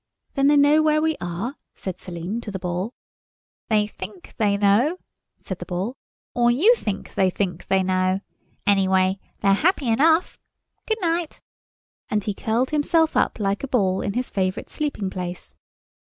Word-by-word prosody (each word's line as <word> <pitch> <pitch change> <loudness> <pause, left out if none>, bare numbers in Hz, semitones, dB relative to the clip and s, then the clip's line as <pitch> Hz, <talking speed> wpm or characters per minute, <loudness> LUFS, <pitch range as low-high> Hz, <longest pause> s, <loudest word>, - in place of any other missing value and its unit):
"Then 275 -1 +3
they 295 0 +5
know 290 +2 +5
where 305 0 +3
we 315 0 +1
are?" 180 - -4 0.2
said 185 -2 -6
Selim 180 +6 -5
to 225 - -7
the 195 - -4
Ball. 180 +4 -3 0.8
"They 210 -2 +3
think 195 -2 -10
they 205 -2 +2
know," 210 - +3 0.4
said - - -7
the - - -6
Ball, 190 +7 -3 0.4
"or 240 0 +3
you 325 - +5
think 205 - -4
they 190 - +3
think 180 -2 -3
they 190 -1 +3
know. 185 +1 +1 0.4
Anyway, 190 -1 +3 0.2
they're 195 -1 +4
happy 300 - +2
enough. 320 +9 +3 0.5
Good 440 - +1
night." 335 -1 -1 0.7
And 210 -1 0
he 205 - -2
curled 230 +6 0
himself 320 +2 +2
up - - +1
like 200 -1 0
a - - -2
ball 195 -7 +1
in 200 - -2
his 250 +2 -1
favourite 190 +1 -2
sleeping 285 -11 -2
place. 180 -1 -6
210 Hz, 165 wpm, -23 LUFS, 190-285 Hz, 0.8 s, they